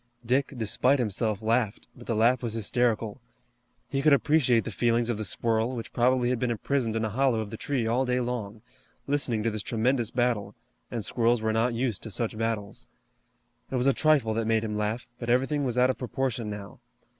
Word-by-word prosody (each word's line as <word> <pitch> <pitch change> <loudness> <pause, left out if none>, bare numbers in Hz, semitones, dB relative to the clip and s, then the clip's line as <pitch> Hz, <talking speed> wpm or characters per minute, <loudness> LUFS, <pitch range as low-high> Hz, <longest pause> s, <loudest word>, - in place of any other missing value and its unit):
Dick, 130 +4 +1
despite 125 +5 +2
himself, 110 -2 -1
laughed, 115 -1 0
but 120 - -13
the 115 - 0
laugh 115 +3 +3
was 115 -3 -3
hysterical. 115 0 0 0.7
He 135 - -1
could 150 0 +5
appreciate 140 -5 +3
the - - -5
feelings 120 +2 +1
of 115 - -3
the - - -2
squirrel, 115 +4 0
which 115 - -7
probably 125 0 +2
had 125 - -1
been 125 - 0
imprisoned 120 0 -1
in 110 0 0
a - - -1
hollow 125 +1 +1
of 105 -2 -4
the - - -5
tree 130 -3 -1
all 120 +4 +1
day 125 -1 0
long, 115 -4 -4 0.4
listening 135 -6 0
to 115 - +1
this 105 0 -3
tremendous 120 +1 0
battle, 115 -5 -1 0.3
and 115 -4 -2
squirrels 120 -1 +1
were 110 0 +1
not 115 +2 +1
used 120 -3 -1
to 110 - -6
such 110 +2 -2
battles. 110 -2 -3 0.8
It - - -3
was 125 0 +1
a 135 - +5
trifle 145 -8 +3
that 115 0 -1
made 115 -1 +2
him 105 -1 -3
laugh, 105 +3 -2
but 120 - -5
everything 135 +4 +2
was 125 -2 -2
out 125 +1 +5
of - - -8
proportion 125 -3 -2
now. 105 -1 -8
115 Hz, 205 wpm, -27 LUFS, 110-125 Hz, 0.8 s, could